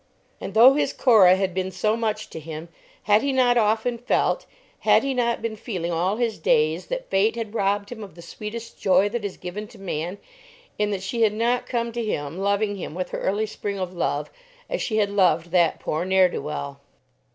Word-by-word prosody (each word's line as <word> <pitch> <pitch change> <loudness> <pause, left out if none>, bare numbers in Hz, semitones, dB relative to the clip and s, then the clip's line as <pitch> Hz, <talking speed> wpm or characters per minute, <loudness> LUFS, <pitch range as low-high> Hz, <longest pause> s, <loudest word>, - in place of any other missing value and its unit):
And 195 - -7
though 245 +4 +8
his 295 - 0
Cora 205 -8 +6
had 190 -1 -1
been 185 0 -2
so 200 +4 0
much 215 -2 -3
to - - -6
him, 160 +1 -8 0.3
had 210 +2 +4
he 280 - 0
not 255 -2 +3
often 225 +1 +1
felt, 245 - 0 0.3
had - - +4
he 275 -1 -1
not 235 -2 0
been 225 -1 -2
feeling 185 -6 -4
all 180 +4 0
his 230 -2 -1
days, 470 -2 +2
that - - -5
Fate 205 +4 +2
had 225 -2 -5
robbed 200 -1 0
him 220 -3 -7
of 195 -5 -11
the 170 - -12
sweetest 215 +6 -8
joy 195 +1 +4
that 235 0 -4
is 200 -2 -5
given 195 +4 -6
to - - -16
man, 180 -1 -4 0.6
in 210 0 +1
that 195 -2 -3
she 230 +4 -3
had 215 -2 +4
not 240 +3 0
come 235 -1 -1
to 235 0 -3
him 150 -5 -3
loving 200 +1 0
him 170 -4 -6
with 180 0 -4
her - - -3
early 205 +3 0
spring 205 -1 -5
of 185 -1 -4
love, 150 -4 -2 0.4
as - - -1
she 220 - -1
had 205 -2 +2
loved 175 -4 +2
that 175 -3 +3
poor 155 +2 -2
ne'er 190 0 +4
do - - -4
well? 140 -2 -5
205 Hz, 215 wpm, -24 LUFS, 185-230 Hz, 0.6 s, though